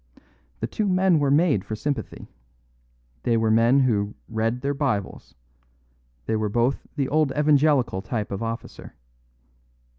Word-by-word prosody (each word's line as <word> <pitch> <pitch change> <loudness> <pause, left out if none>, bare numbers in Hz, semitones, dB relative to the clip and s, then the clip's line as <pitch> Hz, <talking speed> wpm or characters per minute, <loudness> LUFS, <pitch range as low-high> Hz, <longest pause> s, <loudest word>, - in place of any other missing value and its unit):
The - - 0
two 205 - -2
men 185 -3 +3
were 145 -1 +1
made 145 - +3
for 110 +2 -5
sympathy; 140 +5 -4 0.9
they 115 - +1
were 110 -1 +1
men 115 +5 +4
who 105 -5 0
'read 115 +2 -2
their 140 +1 -1
Bibles'; 135 -9 -3 0.9
they 110 - -1
were 110 -1 -1
both 120 +5 0
the 140 -3 -1
old 150 0 +1
Evangelical 145 -8 +3
type 105 0 -4
of 100 - -4
officer. 115 0 -6
125 Hz, 140 wpm, -24 LUFS, 110-145 Hz, 0.9 s, men